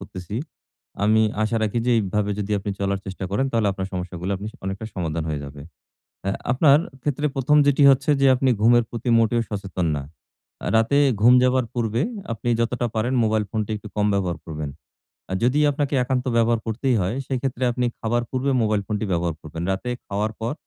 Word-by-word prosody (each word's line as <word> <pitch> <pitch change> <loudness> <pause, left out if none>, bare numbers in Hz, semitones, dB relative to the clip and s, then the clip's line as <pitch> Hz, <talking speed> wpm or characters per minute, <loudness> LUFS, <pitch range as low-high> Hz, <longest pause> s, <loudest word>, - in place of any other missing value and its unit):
করতেছি। 95 +1 -7 0.7
আমি 110 +1 +4 0.2
আশা 115 +2 0
রাখি 110 +2 0
যে - - +3
এইভাবে 105 0 -1
যদি 105 0 -3
আপনি 100 +1 -4
চলার 100 0 0
চেষ্টা 95 0 -5
করেন 130 +7 +1
তাহলে 115 -3 +2
আপনার 95 0 -4
সমস্যাগুলো 90 0 -4
আপনি 100 - -7
স - - -33
অনেকটা 95 +3 -4
সমাধান 80 -3 -2
হয়ে 75 -2 -2
যাবে। 70 0 -10 0.7
আ - - +2 0.2
আপনার 140 +2 +5 0.2
ক্ষেত্রে 145 0 -1
১ম 140 +3 +3
যেটি 145 +1 +4
হচ্ছে 135 +3 +2
যে, 135 - +5
আপনি 130 +1 +2
ঘুমের 120 +1 +5
প্রতি 120 +1 -5
মোটেও 115 +1 +2
সচেতন 95 -4 -3
না। 70 - -3 0.6
আ - - -4
রাতে 115 +6 +3 0.2
ঘুম 120 +2 +7
যাওয়ার 125 -1 +2
পূর্বে 115 0 0 0.3
আপনি 115 +2 -4
যতটা 120 +1 0
পারেন 115 +4 0
মোবাইল 110 -1 +1
ফোনটা 110 -1 -2
একটু 105 0 -9
কম 105 0 +2
ব্যবহার 90 -4 0
করবেন। 75 -2 -5 0.6
আ - - -1
যদি 130 +4 +3
আপনাকে 145 0 -2
একান্ত 125 0 -1
ব্যবহার 115 0 +3
করতেই 120 +3 0
হয়, 95 +6 -1
সেক্ষেত্রে 130 -1 -2
আপনি 125 +1 -1
খাবার 120 +2 0
পূর্বে 130 +2 -1
মোবাইল 105 -2 +1
ফোনটি 105 0 -2
ব্যবহার 85 -1 0
করবেন। 80 +2 -6
রাতে 95 +6 -3 0.2
খাওয়ার 105 +2 -1
পর 115 +5 -1
110 Hz, 190 wpm, -23 LUFS, 95-125 Hz, 0.7 s, ঘুম